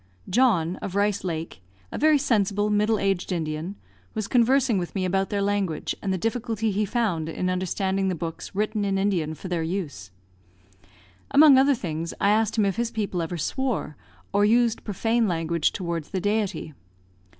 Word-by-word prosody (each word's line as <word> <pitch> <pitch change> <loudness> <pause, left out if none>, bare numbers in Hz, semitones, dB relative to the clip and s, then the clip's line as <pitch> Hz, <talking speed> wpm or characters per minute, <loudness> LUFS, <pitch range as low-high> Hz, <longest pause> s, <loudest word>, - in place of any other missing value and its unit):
John, 185 -7 +2
of 190 - -6
Rice 205 0 +1
Lake, 165 - -4 0.3
a - - -4
very 310 0 +5
sensible, 210 -6 +1
middle 210 +1 +2
aged 195 -3 -1
Indian, 160 +2 -3 0.4
was 215 -2 -2
conversing 245 -2 +3
with 175 +2 -5
me 190 -1 0
about 195 +1 0
their 200 -1 0
language, 200 -6 -1
and 195 - -2
the 190 - 0
difficulty 225 +1 -1
he 210 +2 0
found 190 -8 -1
in 180 +3 -1
understanding 190 +1 -1
the 185 - 0
books 165 +3 -6
written 215 +1 0
in 195 -1 0
Indian 180 -6 0
for 185 - -8
their 175 -2 -1
use. 160 - -4 1.2
Among 285 0 +7
other 275 +1 +4
things, 165 -6 -4
I 200 - +3
asked 220 +1 +1
him 210 - +3
if 195 +1 -1
his 235 0 0
people 205 -6 -2
ever 170 +1 -3
swore, 230 - -2 0.4
or 200 +1 +3
used 230 +2 +3
profane 225 +3 0
language 165 -2 0
towards 170 -4 -4
the 190 - -2
Deity. 205 -5 -1
200 Hz, 175 wpm, -25 LUFS, 175-220 Hz, 1.2 s, Among